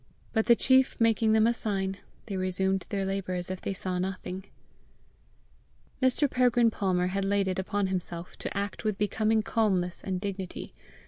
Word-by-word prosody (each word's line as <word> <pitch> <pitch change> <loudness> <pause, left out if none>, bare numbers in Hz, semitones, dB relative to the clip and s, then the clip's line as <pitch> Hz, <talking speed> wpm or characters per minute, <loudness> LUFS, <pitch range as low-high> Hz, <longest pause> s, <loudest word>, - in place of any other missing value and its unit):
But 220 -1 +1
the 235 - +7
chief 260 +2 +3
making 225 -1 +3
them 220 0 +5
a 235 - +4
sign, 195 -4 -2 0.3
they 200 - -4
resumed 190 0 0
their 195 -2 -1
labour 195 -1 -2
as 180 +1 -4
if 185 - -5
they - - -2
saw 185 -1 -3
nothing. 185 0 -4 1.6
Mr. 260 +3 +3
Peregrine 245 -3 +3
Palmer 180 -3 0
had 195 0 0
laid 200 0 +1
it 185 0 -1
upon 200 +1 0
himself 180 -2 -4
to - - -4
act 200 -1 -3
with 215 -3 0
becoming 215 +2 +1
calmness 195 -6 0
and 185 -2 -2
dignity. 195 -2 -5
195 Hz, 170 wpm, -28 LUFS, 185-220 Hz, 1.6 s, the